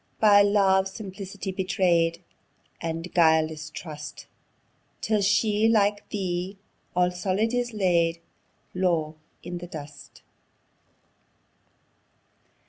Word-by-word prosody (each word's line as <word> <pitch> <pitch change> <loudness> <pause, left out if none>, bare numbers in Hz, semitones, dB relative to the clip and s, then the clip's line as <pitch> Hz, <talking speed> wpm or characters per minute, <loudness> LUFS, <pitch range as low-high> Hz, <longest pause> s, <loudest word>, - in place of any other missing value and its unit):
By 205 -2 +7
love's 195 -2 +3
simplicity 195 -1 -6
betray'd, 175 -3 +1 0.6
And 165 +1 -4
guileless 160 -2 +2
trust; 150 -1 -8 0.7
Till 215 -1 0
she, 210 +2 +3
like 205 -2 +2
thee, 185 -1 -3 0.4
all 180 0 +3
soil'd, 195 +5 -1
is 245 -1 0
laid 170 -5 +1 0.5
Low 165 -4 0 0.3
i' - - -6
the 175 0 -6
dust. 150 -3 -11
185 Hz, 90 wpm, -26 LUFS, 165-205 Hz, 0.7 s, By